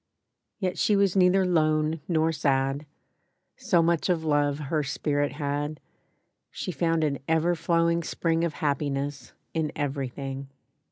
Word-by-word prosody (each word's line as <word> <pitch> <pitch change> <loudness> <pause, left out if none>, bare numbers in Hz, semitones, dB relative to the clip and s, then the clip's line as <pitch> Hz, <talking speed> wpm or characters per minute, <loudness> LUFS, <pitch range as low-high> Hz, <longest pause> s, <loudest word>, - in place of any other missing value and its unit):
Yet 185 -4 -2
she 210 - +3
was 200 -2 +2
neither 185 0 +4
lone 155 -2 +1
nor 160 -2 +2
sad; 140 -1 0 0.7
So 170 -1 +2
much 170 +1 +1
of 170 -3 +1
love 145 -2 +2
her 150 +1 -1
spirit 145 0 -1
had, 145 +1 -3 0.7
She - - -5
found 165 +1 +1
an 140 -3 0
ever 160 +2 +2
flowing 170 0 +1
spring 165 0 0
Of 170 -2 0
happiness 140 -1 -2 0.2
in 160 -2 -1
everything. 135 -1 -4
155 Hz, 130 wpm, -27 LUFS, 145-170 Hz, 0.7 s, neither